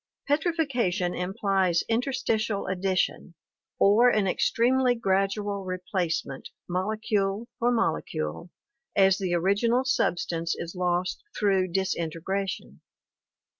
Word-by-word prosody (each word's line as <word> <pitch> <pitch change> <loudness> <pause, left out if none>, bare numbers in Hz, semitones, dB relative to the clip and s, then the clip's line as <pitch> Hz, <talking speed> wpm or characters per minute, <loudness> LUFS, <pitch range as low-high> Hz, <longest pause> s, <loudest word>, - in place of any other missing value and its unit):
Petrifaction 275 - 0
implies 190 -2 0
interstitial 225 -3 0
addition 185 -2 -1 0.4
or 220 +5 +5
an 210 -4 +2
extremely 245 +6 +2
gradual 195 -1 0
replacement, 180 -6 -3 0.2
molecule 205 +3 -1
for 240 +1 +2
molecule, 80 - -2 0.5
as 195 -1 +4
the 185 -3 0
original 210 +8 +2
sub 255 -8 +1
stance 165 -1 -2
is 170 0 -6
lost 180 0 -1 0.2
through 195 -3 +2
disintegration. 175 - -3
195 Hz, 95 wpm, -27 LUFS, 180-225 Hz, 0.5 s, or